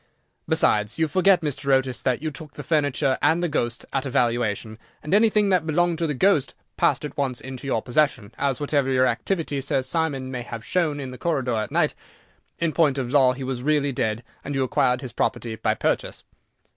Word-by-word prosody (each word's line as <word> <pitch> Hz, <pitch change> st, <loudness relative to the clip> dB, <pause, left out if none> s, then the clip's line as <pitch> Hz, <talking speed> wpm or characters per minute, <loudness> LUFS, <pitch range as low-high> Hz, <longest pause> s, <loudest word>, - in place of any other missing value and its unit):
Besides, 105 Hz, 0 st, +2 dB
you 160 Hz, -1 st, +2 dB
forget, 185 Hz, +3 st, +4 dB
Mr. 140 Hz, -2 st, -2 dB
Otis, 130 Hz, -1 st, +2 dB
that 130 Hz, +2 st, 0 dB
you 155 Hz, -, -2 dB
took 150 Hz, +1 st, -9 dB
the 145 Hz, -, -7 dB
furniture 145 Hz, -3 st, +1 dB
and 170 Hz, +2 st, +3 dB
the -, -, +2 dB
ghost 120 Hz, -6 st, -2 dB
at 135 Hz, -1 st, 0 dB
a -, -, -3 dB
valuation, 115 Hz, -3 st, 0 dB, 0.2 s
and 150 Hz, -, -3 dB
anything 210 Hz, -1 st, +4 dB
that 180 Hz, -4 st, +2 dB
belonged 170 Hz, +1 st, +1 dB
to 165 Hz, -, 0 dB
the 150 Hz, -, -2 dB
ghost 165 Hz, -1 st, +2 dB, 0.2 s
passed -, -, +1 dB
at 150 Hz, -, -7 dB
once 130 Hz, -3 st, -1 dB
into 130 Hz, 0 st, -8 dB
your 115 Hz, -5 st, 0 dB
possession, 125 Hz, -5 st, 0 dB
as, 140 Hz, -2 st, 0 dB
whatever 135 Hz, -3 st, +2 dB
activity 145 Hz, +3 st, -1 dB
Sir 135 Hz, -1 st, 0 dB
Simon 135 Hz, -2 st, -2 dB
may 125 Hz, -1 st, -4 dB
have 115 Hz, -1 st, -7 dB
shown 160 Hz, -5 st, 0 dB
in 135 Hz, -2 st, -5 dB
the 125 Hz, -, -10 dB
corridor 135 Hz, -8 st, 0 dB
at 110 Hz, -, -2 dB
night, -, -, +1 dB, 0.6 s
in 165 Hz, -2 st, -1 dB
point 150 Hz, -5 st, +3 dB
of 125 Hz, -2 st, -2 dB
law 135 Hz, -3 st, +5 dB
he 130 Hz, +1 st, -7 dB
was 130 Hz, -1 st, -3 dB
really 145 Hz, 0 st, +1 dB
dead, 110 Hz, -2 st, -2 dB, 0.2 s
and 140 Hz, 0 st, -4 dB
you 135 Hz, -, +1 dB
acquired 125 Hz, 0 st, +1 dB
his 130 Hz, -5 st, -7 dB
property 120 Hz, -2 st, -1 dB
by -, -, 0 dB
purchase." -, -, -1 dB
135 Hz, 205 wpm, -24 LUFS, 125-155 Hz, 0.6 s, law